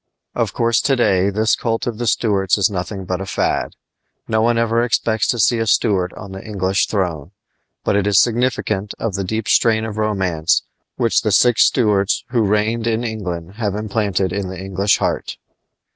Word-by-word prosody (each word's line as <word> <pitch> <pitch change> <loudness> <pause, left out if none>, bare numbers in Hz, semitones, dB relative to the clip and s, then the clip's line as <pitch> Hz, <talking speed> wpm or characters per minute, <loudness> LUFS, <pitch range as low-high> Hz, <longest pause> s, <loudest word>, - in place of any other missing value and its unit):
Of - - -1
course, 115 0 +1
to 135 - +2
day 100 -6 +2
this 110 +2 +1
cult 115 -1 -2
of 120 -2 -4
the 120 - -2
Stuarts 100 -4 +1
is 100 +1 +2
nothing 95 +1 -4
but 90 +1 -3
a - - -4
fad. - - -1 0.5
No 110 0 +1
one 120 +1 +2
ever 115 0 +1
expects 110 -2 0
to 120 - 0
see 115 +1 +3
a 115 - -1
Stuart 95 -4 +2
on 95 - -10
the 95 0 -8
English 95 -3 0
throne. 85 -7 -2 0.5
But - - +1
it 100 0 +1
is 100 -2 +4
significant 115 -4 0
of 115 - -3
the 95 +1 -2
deep 110 +3 -3
strain 110 -1 +3
of 110 -1 -5
romance 95 -7 0 0.3
which 115 - +1
the 110 - -1
six 120 +4 +5
Stuarts 105 -5 +1
who 120 -1 +1
reigned 110 +3 0
in 115 +1 0
England 95 -5 -5
have 105 -4 -2
implanted 100 -3 -1
in 100 -1 -3
the 95 -1 -7
English 95 +1 +1
heart. - - -2
105 Hz, 190 wpm, -19 LUFS, 95-115 Hz, 0.5 s, six